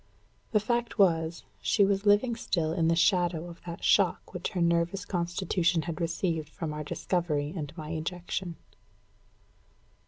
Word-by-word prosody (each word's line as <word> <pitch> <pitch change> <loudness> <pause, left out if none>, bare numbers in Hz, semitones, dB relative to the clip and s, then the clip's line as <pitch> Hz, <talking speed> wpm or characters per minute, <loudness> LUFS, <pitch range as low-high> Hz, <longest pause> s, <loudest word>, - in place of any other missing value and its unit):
The 215 - +4
fact 235 +3 -1
was, 165 -4 +2 0.2
she 200 - +3
was 200 +1 0
living 210 +4 +4
still 165 -8 -1
in 165 -2 +1
the 165 - +3
shadow 175 -1 +2
of 170 -1 -11
that 170 0 -6
shock - - +2
which - - -3
her 185 - -2
nervous 170 +3 +1
constitution 175 -1 0
had 170 0 -5
received 165 -2 -1
from 155 -1 -5
our 150 0 -4
discovery 150 -2 -1
and 150 -5 -4
my 155 -1 -6
ejection. 175 +2 -4
170 Hz, 150 wpm, -29 LUFS, 165-190 Hz, 0.2 s, The